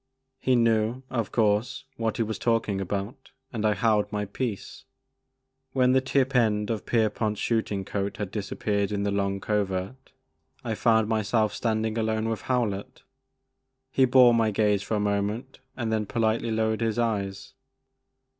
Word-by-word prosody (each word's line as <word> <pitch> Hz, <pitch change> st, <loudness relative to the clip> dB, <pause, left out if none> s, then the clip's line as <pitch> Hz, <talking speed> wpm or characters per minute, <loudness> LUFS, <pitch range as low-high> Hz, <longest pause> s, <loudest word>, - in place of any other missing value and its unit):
He 130 Hz, -, +2 dB
knew, 115 Hz, +1 st, +2 dB
of 115 Hz, -6 st, -2 dB
course, 115 Hz, +4 st, +1 dB
what 115 Hz, -1 st, -2 dB
he 115 Hz, -, +2 dB
was 110 Hz, -2 st, -4 dB
talking 110 Hz, -4 st, 0 dB
about 100 Hz, +8 st, -4 dB, 0.2 s
and 110 Hz, -2 st, -3 dB
I 105 Hz, -1 st, +3 dB
held 105 Hz, -3 st, +1 dB
my 105 Hz, -1 st, -2 dB
peace. 105 Hz, 0 st, -5 dB, 0.9 s
When 130 Hz, -1 st, +3 dB
the 130 Hz, 0 st, +4 dB
tip 135 Hz, 0 st, 0 dB
end 105 Hz, -3 st, +2 dB
of 110 Hz, -, -4 dB
Pierpont's 110 Hz, -2 st, 0 dB
shooting 105 Hz, -4 st, -1 dB
coat 100 Hz, +1 st, -3 dB
had 100 Hz, -3 st, -4 dB
disappeared 100 Hz, 0 st, -2 dB
in 100 Hz, -1 st, -1 dB
the 100 Hz, -, 0 dB
I/)ng 100 Hz, -1 st, -1 dB
Covert, 100 Hz, +3 st, -2 dB, 0.5 s
I 115 Hz, -3 st, -2 dB
found 110 Hz, -1 st, +3 dB
my 110 Hz, -1 st, +1 dB
self 110 Hz, +1 st, +1 dB
standing 110 Hz, -1 st, -1 dB
alone 110 Hz, 0 st, 0 dB
with 115 Hz, -, -3 dB
Howlett. 120 Hz, -1 st, -2 dB, 0.9 s
He 130 Hz, -, +4 dB
bore 125 Hz, -1 st, +6 dB
my 115 Hz, -1 st, +3 dB
gaze 105 Hz, -1 st, +2 dB
for 110 Hz, -, -2 dB
a -, -, 0 dB
moment 105 Hz, +5 st, -2 dB, 0.2 s
and 115 Hz, -3 st, -1 dB
then 110 Hz, -1 st, -1 dB
politely 115 Hz, +1 st, 0 dB
lowered 110 Hz, 0 st, 0 dB
his 115 Hz, -1 st, 0 dB
eyes. 100 Hz, -4 st, -2 dB
110 Hz, 160 wpm, -26 LUFS, 105-115 Hz, 0.9 s, bore